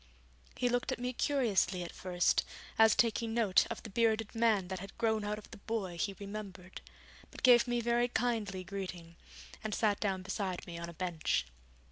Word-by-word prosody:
He 250 - +1
looked 245 0 0
at - - -1
me 250 +1 -3
curiously 210 -10 +1
at 170 - -7
first, 180 -1 +1 0.4
as 220 -1 +7
taking 230 -1 +1
note 215 -6 +4
of - - -5
the 220 - -7
bearded 225 0 +1
man 225 -5 +2
that 190 -1 -3
had 195 +1 -10
grown 220 -2 +1
out 210 0 -2
of 210 - -12
the - - -9
boy 200 -4 -3
he 200 +1 -1
remembered, 195 -3 -7 0.5
but - - -12
gave 245 -1 +7
me 240 0 0
very 240 +1 +2
kindly 220 -6 -1
greeting, 180 -3 -6 0.5
and 215 -2 -2
sat 210 -3 +2
down 190 -3 -1
beside 190 -2 -3
me 170 -1 -7
on 170 0 -5
a - - -9
bench. 160 - 0
205 Hz, 185 wpm, -33 LUFS, 185-230 Hz, 0.5 s, as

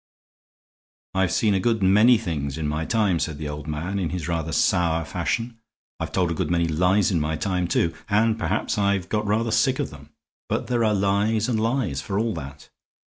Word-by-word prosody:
"I've 95 -2 +1
seen 105 -2 +2
a 95 - +2
good 110 +1 +1
many 105 +6 +6
things 75 -9 -3
in 80 -2 -2
my 75 +2 -2
time," 105 -5 +1
said 80 -3 -2
the 75 0 -5
old 75 +1 -6
man, 85 +6 -3
in 85 -4 -1
his 90 -3 -4
rather 80 -2 -2
sour 85 0 +2
fashion. 115 - -3 0.4
"I've - - -4
told 90 -2 +1
a - - 0
good - - -2
many 85 -1 +1
lies 90 +5 +2
in 85 - +1
my 75 +1 -1
time, 90 +1 -1
too, 85 -1 +1 0.2
and 110 +2 +2
perhaps 110 - -1
I've 100 -2 +1
got 105 -1 -1
rather 110 +2 +1
sick - - +2
of - - -3
them. - - -13 0.4
But - - -1
there 120 -2 0
are 110 -1 +2
lies 100 +3 +1
and 115 -3 0
lies, 110 - 0
for 100 -2 -3
all 110 +1 0
that. 70 -3 -9
95 Hz, 205 wpm, -24 LUFS, 80-110 Hz, 0.4 s, many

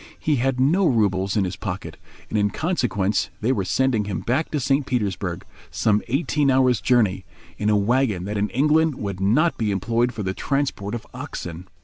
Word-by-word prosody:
He 150 -2 0
had 130 +1 0
no 170 +8 +3
roubles 100 -5 +1
in 100 - +3
his 90 0 -3
pocket, 100 -2 -5 0.3
and - - -6
in 105 -1 +2
consequence 120 - 0
they 115 +4 +1
were 105 -7 0
sending 115 +2 +1
him 95 -4 -3
back 130 +10 0
to 150 - -1
St. 135 +2 +1
Petersburg—some 105 -1 -2
eighteen 145 +1 +1
hours' 130 -3 +3
journey—in 105 -2 0
a 105 - +4
wagon 105 -2 +1
that 105 +2 -4
in 105 +1 0
England 150 +3 +2
would 100 -5 -5
not 120 - +2
be 110 -2 0
employed 115 +5 0
for 110 - -5
the 95 0 -2
transport 135 -6 -2
of 120 - -7
oxen. 90 +1 -7
115 Hz, 180 wpm, -23 LUFS, 100-135 Hz, 0.3 s, a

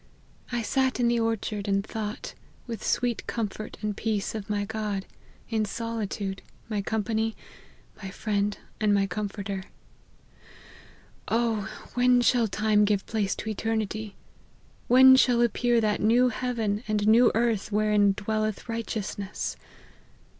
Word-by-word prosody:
I 240 -1 -1
sat 260 +2 +1
in 240 -1 +3
the 235 0 +2
orchard, 220 -2 -2
and 195 0 +1
thought, 215 -1 -5 0.3
with 230 -4 -6
sweet 245 -2 0
comfort 215 -1 -4
and 210 -1 -1
peace, 215 -2 -1
of 215 -2 -6
my 205 -1 0
God; 210 -2 -3 0.4
in 220 -2 +1
solitude, 210 -3 -3 0.3
my 210 -3 -1
company, 220 +1 -1 0.7
my 190 - -5
friend 205 0 -1 0.2
and 205 -2 +2
comforter. 200 -1 -4 1.6
Oh! 225 -3 0 0.2
when 250 0 +4
shall 240 -2 +3
time 215 0 +2
give 205 -1 +1
place 210 -3 -1
to 220 - -5
eternity! 215 -1 -2 0.7
When 260 +1 +8
shall 250 -2 +4
appear 240 0 +2
that 215 -2 0
new 240 +4 +4
heaven 230 -3 -2
and 210 -1 0
new 235 +2 +6
earth 225 -2 +1
wherein 210 -1 +3
dwelleth 215 +1 -2
righteousness 215 -3 -4
215 Hz, 125 wpm, -27 LUFS, 205-230 Hz, 1.6 s, When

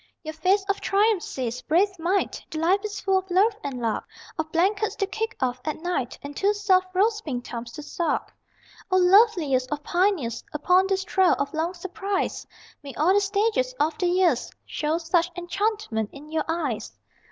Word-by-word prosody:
Your 315 0 -5
face 375 +5 +2
of 400 0 -1
triumph 410 -1 +2
says, 250 -5 -4
brave 375 +3 +1
mite, 365 +4 0
That 315 - -5
life 350 +5 +3
is 415 -1 -4
full 385 -1 +2
of 380 0 -12
love 400 +5 +3
and 270 -3 -4
luck 230 -2 -2 0.3
Of 315 0 -3
blankets 395 +6 +1
to 395 - 0
kick 440 +3 -4
off 250 -1 -1
at 310 - -3
night, 350 -9 -2
And 285 0 -7
two 405 +5 +2
soft 380 -3 +3
rose 425 +3 +2
pink 250 -8 -4
thumbs 235 0 -6
to 300 - -8
suck. 335 +2 -2 0.6
O 370 - +3
loveliest 360 - +4
of 295 0 -3
pioneers 350 - 0
Upon 360 +5 +3
this 385 -1 0
trail 380 -1 +3
of 280 - -2
long 330 +3 -1
surprise, 385 +2 -3 0.3
May 280 -3 -9
all 330 +6 +3
the 410 - +4
stages 445 +5 0
of 305 +1 +1
the 360 - +2
years 350 -8 +2 0.2
Show 305 +2 -1
such 340 +1 +1
enchantment 350 - -1
in 295 +2 -12
your 315 -1 0
eyes! 310 -9 -3
355 Hz, 185 wpm, -25 LUFS, 300-395 Hz, 0.6 s, loveliest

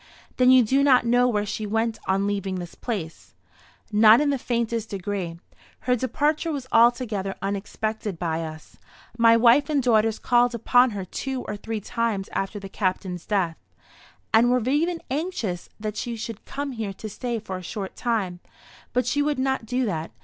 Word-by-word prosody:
"Then 255 0 +5
you 255 -1 +7
do 265 +5 +2
not 255 -3 +5
know 245 +1 +4
where 210 -4 0
she 210 +1 -4
went 225 +1 -1
on 195 +1 +1
leaving 195 -2 -2
this 175 -2 -6
place?" 195 -10 -6 0.6
"Not 215 +2 +7
in 295 -1 +2
the 275 - -1
faintest 230 -2 -2
degree. 190 -3 -4 0.4
Her 250 - +2
departure 295 +6 0
was 280 -4 -4
altogether 230 -5 +2
unexpected 205 0 -3
by 165 -1 -2
us. 155 -1 -9 0.4
My 230 -1 +6
wife 250 +5 +5
and 285 -3 +1
daughters 225 -2 +3
called 245 0 +2
upon 245 +2 +4
her 190 - -4
two 260 +7 -4
or - - -5
three 220 +1 -5
times 225 -3 -2
after 195 +2 -2
the 195 - -8
Captain's 185 -2 -3
death, 185 -6 0 0.8
and 230 +2 +5
were 250 -1 +1
even 330 +5 +1
anxious 265 - -3
that 215 0 -4
she 235 -1 -3
should 225 -1 -7
come 285 0 -4
here 220 -5 -4
to 215 - -8
stay 240 +3 -3
for 190 -4 -5
a - - -8
short 195 +1 -6
time; 205 -7 -1 0.5
but 250 +1 +1
she 285 +4 +1
would 295 -1 0
not 265 -3 -1
do 250 +2 0
that. 165 -6 -3
225 Hz, 180 wpm, -24 LUFS, 195-250 Hz, 0.8 s, you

